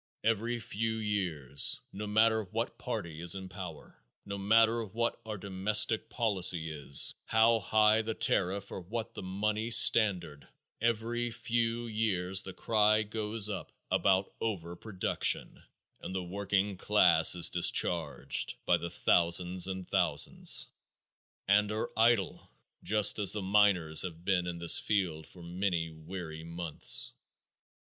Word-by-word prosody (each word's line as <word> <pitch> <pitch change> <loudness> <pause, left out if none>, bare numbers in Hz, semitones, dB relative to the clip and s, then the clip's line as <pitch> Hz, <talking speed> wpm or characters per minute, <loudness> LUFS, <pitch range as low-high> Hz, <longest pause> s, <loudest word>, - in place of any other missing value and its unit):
Every 115 +2 -1
few 110 +1 -3
years, 90 - -2
no 105 +1 -6
matter 110 +1 +2
what 90 - -5
party 80 -1 -6
is 85 +2 0
in 95 -1 -8
power, 90 -5 -10 0.2
no 100 - -6
matter 115 +3 +2
what 115 +3 -3
our 110 -1 -5
domestic 105 +3 +1
policy 95 -8 +1
is, 70 -2 +3
how 115 +1 +3
high 110 +1 +2
the 110 0 -5
tariff 100 +2 -1
or - - -6
what 110 +6 -6
the - - -8
money 105 +4 -3
standard, 90 - +4 0.3
every 120 +1 -1
few 115 0 -2
years 95 -4 0
the 95 - -7
cry 110 +2 +1
goes 110 0 -1
up 105 -2 -6 0.2
about 95 0 +1
"over 90 -6 -4
production" 95 0 -1 0.4
and 95 - -7
the 95 - -3
working 100 +1 -2
class 90 -5 +4
is 85 - +2
discharged 80 -5 +1
by - - +3
the - - -6
thousands 90 +2 +1
and 95 -1 -6
thousands, - - 0 0.8
and 105 +1 +2
are 110 +2 -4
idle, 115 -3 +1 0.3
just 105 0 +2
as 100 -2 +5
the 105 - -3
miners 95 -5 +3
have 85 -1 -6
been 90 -3 0
in 85 -1 -5
this 85 0 +5
field 85 -7 -2
for 90 - -15
many 85 -2 -3
weary 80 0 -9
months. 85 -1 -1
100 Hz, 135 wpm, -30 LUFS, 90-110 Hz, 0.8 s, as